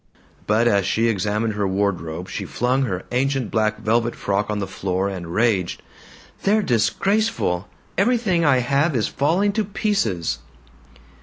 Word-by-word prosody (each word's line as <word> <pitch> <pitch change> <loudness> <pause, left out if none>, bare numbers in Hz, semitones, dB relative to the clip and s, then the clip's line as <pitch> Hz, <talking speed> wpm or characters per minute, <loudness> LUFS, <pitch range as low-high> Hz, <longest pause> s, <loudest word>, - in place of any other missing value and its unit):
But 110 +3 +3
as 100 -4 +2
she 115 +1 +2
examined 105 +2 0
her 105 -1 -1
wardrobe 95 -5 -2
she - - -4
flung 130 +3 0
her 95 -5 -3
ancient 130 -1 0
black 110 -1 +1
velvet 115 +2 +1
frock 100 +1 -1
on 105 - -1
the 100 - -2
floor 95 0 -2
and 90 -3 -5
raged, 100 -4 +1 0.6
"They're 210 +2 +2
disgraceful. 130 - +1 0.3
Everything 205 -6 +2
I 135 -5 +4
have 140 +5 +1
is 110 - +1
falling 175 +9 +1
to 215 +1 0
pieces." 195 - -1
115 Hz, 145 wpm, -22 LUFS, 100-150 Hz, 0.6 s, I